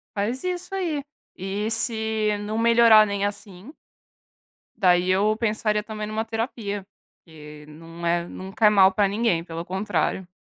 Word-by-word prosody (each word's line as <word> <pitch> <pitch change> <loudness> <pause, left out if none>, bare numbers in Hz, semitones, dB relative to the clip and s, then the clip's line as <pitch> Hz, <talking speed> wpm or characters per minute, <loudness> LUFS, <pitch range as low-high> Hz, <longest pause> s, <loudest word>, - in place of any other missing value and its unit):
Faz 225 - -2
isso 365 +1 -4
aí. 335 -6 -2 0.4
E 200 +4 -3
se 220 -2 -1
não 210 +2 -4
melhorar 230 -2 +6
nem 200 0 -1
assim 205 - -7 1.0
daí, 180 -2 +3
eu 210 +3 +2
pensaria 215 -2 0
também 215 -1 -6
numa 220 +1 -3
terapia, 225 -3 -4 0.4
que 150 -2 -13
não 165 +2 -10
é 170 0 0
não 190 +2 -9
cai 210 +1 +4
mal 195 -2 +5
pra 200 +1 +2
ninguém, 200 -5 0
pelo 165 0 -7
contrário. 190 -1 -2
210 Hz, 145 wpm, -24 LUFS, 185-225 Hz, 1.0 s, melhorar